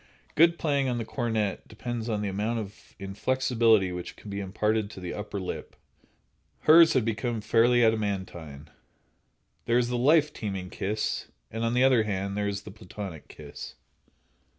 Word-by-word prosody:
Good 170 +2 +5
playing 140 -4 +1
on 120 - -1
the 115 - -3
cornet 110 -5 -2
depends 120 +1 -5
upon 105 -2 -1
the - - -1
amount 105 +4 -1
of 105 -3 -8
inflexibility 110 0 +2
which 90 0 -6
can 105 - -10
be 100 - -3
imparted 105 +2 0
to 105 - -10
the 90 -1 -5
upper 105 -1 -5
lip. 95 - -6 0.9
Hers 165 +1 +7
had 130 -5 +2
become 115 +1 -1
fairly 120 +3 +4
adamantine." 95 -9 -2 0.9
There 115 - +3
is 120 -1 +1
the 125 -1 -1
"life 150 +3 +4
teeming 95 -4 -5
kiss," 105 +2 -2 0.2
and, 115 +1 -3
on 115 +1 0
the 125 - +4
other 130 -3 +5
hand, 100 -2 -2
there 105 0 -1
is 100 0 -3
the 105 - -9
Platonic 95 -5 -8
kiss. - - -10
110 Hz, 165 wpm, -27 LUFS, 100-120 Hz, 0.9 s, Hers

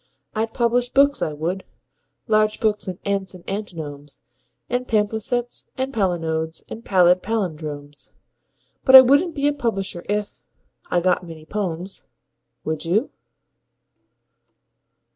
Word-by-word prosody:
I'd 225 +1 -1
publish 245 +1 +1
books, 280 +2 +3
I 155 - 0
would 170 +6 -3 0.6
large 215 -1 +2
books 210 -2 0
on 185 -2 -4
ants 195 -2 -2
and 180 - -15
antinomes 155 -8 -6 0.5
And 245 +1 -2
palimpsests 220 +3 -1
and 265 +1 -2
palinodes 165 -6 -1
and 225 - -8
pallid 180 -2 +4
pallindromes: 155 -9 -4 0.7
But 265 - +7
I 260 - +14
wouldn't 285 +7 +3
be 285 0 +1
a 290 - +2
publisher 195 -9 -2
if.... 210 0 -2 0.5
I 175 - +2
got 185 +1 +2
many 165 -2 -10
"pomes." 185 -1 -4 0.6
Would 155 0 -3
you? 195 - +1
200 Hz, 125 wpm, -22 LUFS, 170-235 Hz, 0.7 s, I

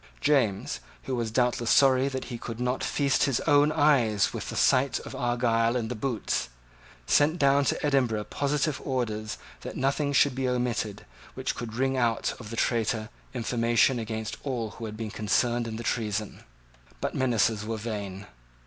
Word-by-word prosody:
James, 130 -10 +1 0.2
who 130 - -2
was 115 -2 -1
doubtless 120 0 +1
sorry 135 -1 +5
that 130 -1 -4
he 120 -3 -6
could 115 0 -6
not 125 +1 -1
feast 140 -2 +2
his 135 -4 +1
own 145 -1 +4
eyes 140 -9 +3
with - - -5
the - - -5
sight 130 0 +3
of - - -9
Argyle 120 -2 +1
in 115 -3 -1
the - - -2
boots, 110 - -2 0.6
sent 150 - +3
down 140 -2 +4
to - - 0
Edinburgh 125 -7 +1
positive 145 +4 -1
orders 110 -5 -2 0.2
that - - -7
nothing 140 +2 0
should 140 -1 +4
be 130 0 -1
omitted 120 -4 -2 0.3
which - - -2
could 115 -2 -6
wring 135 +1 +1
out 115 -2 +1
of 110 -4 -9
the 115 - -5
traitor 110 -2 0 0.3
information 120 +1 +2
against 110 -1 -4
all 120 -6 -3
who 115 - -8
had 110 -1 -7
been 110 -2 -4
concerned 120 +2 +1
in 110 - -5
the 115 - -5
treason. 105 -3 -2 0.6
But - - -2
menaces 115 -4 +1
were 110 +1 -3
vain. 100 -3 -5
120 Hz, 170 wpm, -27 LUFS, 110-135 Hz, 0.6 s, sorry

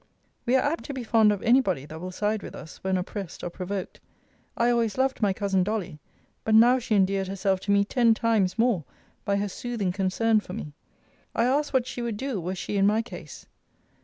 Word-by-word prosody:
We 250 - +3
are 265 - +4
apt 315 +4 -1
to 280 - -5
be 255 - -4
fond 220 -2 +4
of 205 - -3
any 245 +3 +5
body 180 - -2
that 160 +2 -9
will 185 - -5
side 210 +3 -1
with - - -8
us, 160 - -11
when 190 0 +1
oppressed 185 0 -6
or 175 - -3
provoked. 185 +2 -5 0.6
I 235 +1 +3
always 230 -2 0
loved 265 -1 0
my 205 -2 +3
cousin 195 -1 +1
Dolly; 200 -6 -3 0.4
but 220 - +2
now 240 +3 +6
she 230 -3 -1
endeared 195 0 +2
herself 190 0 0
to 200 - -2
me 200 0 +4
ten 230 0 +3
times 220 -5 +1
more, 225 -7 +2 0.4
by 200 - +1
her 200 +1 0
soothing 210 -1 -3
concern 205 +4 +2
for 185 - -9
me. 155 -8 -6 0.6
I 230 - +3
asked 285 +4 +1
what 260 -3 +2
she 245 - -5
would 235 -3 -3
do, 255 -5 -3
were 180 +3 -3
she 200 +2 -3
in 195 0 +4
my 215 +2 +2
case? - - -10
210 Hz, 220 wpm, -26 LUFS, 190-235 Hz, 0.6 s, now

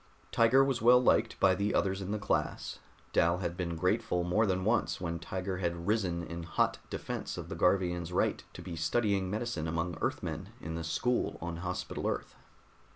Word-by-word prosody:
Tiger 120 +4 +5
was 135 -4 0
well 125 +2 +7
liked 115 -2 +2
by 95 -1 +5
the 100 +3 0
others 95 0 +1
in 95 - -5
the 105 - 0
class; 100 - -1 0.3
Dal 85 +1 +3
had 85 -2 -3
been 85 -2 -3
grateful 90 +1 +1
more 105 +6 +2
than 95 0 0
once 80 -9 +1
when 85 -1 -3
Tiger 95 +2 -3
had 85 -2 -2
risen 95 -5 0
in 85 +1 -6
hot 85 -1 0
defense - - -4
of - - -6
the - - -4
Garvian's 90 -2 +1
right 90 - +1
to - - -9
be 85 - -6
studying 100 +2 +1
medicine 105 -6 -2
among 85 +1 -1
Earthmen - - -2
in 80 - -6
the 85 0 -3
school 120 +9 0
on 85 0 -4
Hospital 90 +1 -3
Earth. - - -3
90 Hz, 185 wpm, -31 LUFS, 85-105 Hz, 0.3 s, well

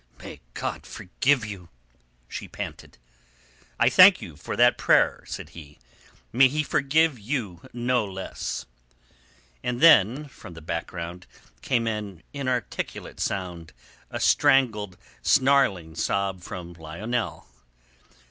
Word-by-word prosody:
"May - - -10
God - - -4
forgive 125 +6 0
you," 95 -5 -8 0.6
she - - -7
panted. - - -8 0.8
"I 120 - +5
thank 185 +8 +8
you 80 - -9
for 75 - -6
that - - +5
prayer," - - +3
said - - -7
he. 75 -3 -13 0.6
"May 130 +3 +7
He 150 +4 -1
forgive 150 -1 +2
you 105 - -4
no 120 0 0
less." 95 -2 -5 1.0
And 125 0 -2
then 145 - +5
from 90 -10 -13
the 80 - -10
background 85 +2 -5 0.3
came 120 -3 0
an 105 -6 -4
inarticulate 130 -4 -4
sound, 85 -5 -4 0.4
a - - -5
strangled, 105 -8 +3 0.2
snarling 130 -12 +3
sob 95 +2 -1
from 90 0 -8
Lionel. 95 +9 -4
105 Hz, 115 wpm, -25 LUFS, 90-130 Hz, 1.0 s, thank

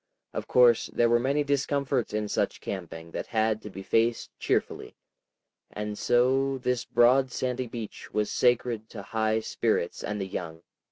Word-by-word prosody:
Of - - -4
course 120 -2 +5
there 120 -1 +2
were 120 - +5
many 140 +4 +1
discomforts 140 -3 0
in 105 0 -1
such - - -1
camping 85 -4 -6
that - - -5
had 110 -1 +1
to 105 - -8
be 95 -1 -8
faced 115 +4 +1
cheerfully, - - -1 0.8
and 105 0 -4
so 135 +4 +2
this 125 -1 -1
broad 130 +2 +4
sandy 125 0 -2
beach 115 -2 -8
was 105 -1 -1
sacred 120 -3 +1
to 100 -3 -8
high 110 +1 0
spirits 110 -5 -1
and 105 0 -3
the 95 - -2
young. 85 -3 -6
115 Hz, 160 wpm, -27 LUFS, 105-125 Hz, 0.8 s, course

